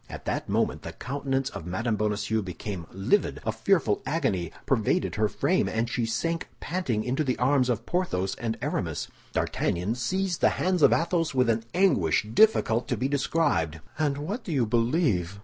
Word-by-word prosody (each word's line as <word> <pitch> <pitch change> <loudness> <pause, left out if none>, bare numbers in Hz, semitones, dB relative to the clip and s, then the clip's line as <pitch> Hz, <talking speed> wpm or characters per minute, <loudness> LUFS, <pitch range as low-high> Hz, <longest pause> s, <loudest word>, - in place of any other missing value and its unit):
At - - -8
that - - -2
moment - - 0
the - - -7
countenance 135 0 -2
of 80 - -7
Mme. 110 +6 -1
Bonacieux 105 +1 0
became 95 -2 -6
livid; 100 - +1
a - - +1
fearful 165 - +1
agony 130 - -1
pervaded 110 - +1
her 110 +1 +2
frame, - - +1
and 115 +1 0
she 120 -1 -1
sank 165 +9 -1
panting 135 -12 -1
into 130 +6 0
the 130 -3 -1
arms 130 0 +2
of 115 -1 -1
Porthos 95 - -1
and 115 -1 -3
Aramis. - - -2 0.2
D'Artagnan 90 +6 0
seized 180 +9 -1
the - - +6
hands 185 -2 +1
of - - +7
Athos 165 -3 +1
with 125 -2 +4
an 115 0 -2
anguish 145 - +3
difficult 125 - +4
to - - -1
be 130 - 0
described. 135 - 0 0.2
"And 145 -3 +1
what 200 - -4
do 180 - -5
you 135 -6 +2
believe?" 115 - +1
125 Hz, 175 wpm, -27 LUFS, 105-155 Hz, 0.2 s, of